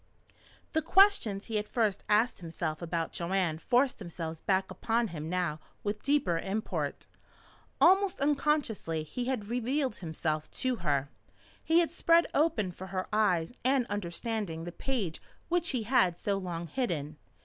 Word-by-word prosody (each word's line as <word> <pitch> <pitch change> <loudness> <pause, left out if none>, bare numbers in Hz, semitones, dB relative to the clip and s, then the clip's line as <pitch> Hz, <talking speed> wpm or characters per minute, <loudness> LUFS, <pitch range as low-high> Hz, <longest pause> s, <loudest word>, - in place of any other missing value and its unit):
The 315 - +2
questions 330 - +4
he 225 -2 -2
had 210 0 -2
first 215 -5 0
asked 220 +4 +3
himself 165 -2 -4
about 165 -1 -2
Joanne 170 -2 0
forced 250 +7 +2
themselves 165 -4 -6
back 190 -1 +1
upon 225 +4 0
him 155 -2 -5
now 175 -4 -1 0.2
with 205 +1 -2
deeper 280 - +2
import. 205 +5 -3 0.7
Almost 385 +2 +5
unconsciously 280 - 0
he 240 +11 -4
had 245 -5 -2
revealed 250 +1 0
himself 155 -2 -3 0.2
to 255 -2 +2
her. 145 -6 0 0.5
He 330 +2 +4
had 335 - 0
spread 335 0 +4
open 285 - +2
for 185 +2 -9
her 185 0 -3
eyes 190 -4 +2
and 260 0 +3
understanding 200 -2 -3
the 175 - -5
page 200 -4 -3 0.3
which 345 -1 +2
he 250 -4 -1
had 215 -7 +3
so 200 - -1
long 175 -3 -4
hidden. 160 - -2
205 Hz, 150 wpm, -30 LUFS, 170-255 Hz, 0.7 s, Almost